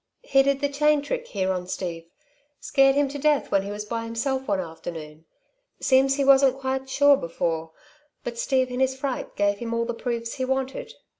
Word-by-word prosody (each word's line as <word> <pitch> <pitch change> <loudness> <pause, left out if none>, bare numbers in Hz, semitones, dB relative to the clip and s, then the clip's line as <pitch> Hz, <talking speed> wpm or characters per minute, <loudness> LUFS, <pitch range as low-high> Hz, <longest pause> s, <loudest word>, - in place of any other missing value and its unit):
He 270 - +4
did 275 +1 +1
the 285 - +2
chain 295 +1 +2
trick 485 +8 -3
here 190 - -1
on 180 -1 -3
Steve 170 -3 -5 0.5
scared 270 -1 +3
him 285 0 +3
to 285 +1 -6
death 295 0 +1
when 195 - +3
he 195 - -6
was 205 +1 -5
by 230 +1 -3
himself 260 +4 -2
one 200 -2 +1
afternoon. 160 -2 -8 0.5
Seems 270 +1 +3
he 280 -1 0
wasn't 270 -1 +5
quite 265 0 -3
sure 285 +1 +5
before, 165 -2 -3 0.5
but 235 -1 -5
Steve 260 -1 +1
in 250 - -3
his 265 0 +1
fright 265 -1 -4
gave 205 0 +1
him 230 -1 -3
all 230 0 0
the 240 - -3
proofs 230 -1 -3
he 260 - -3
wanted. 265 0 -3
260 Hz, 200 wpm, -25 LUFS, 200-275 Hz, 0.5 s, wasn't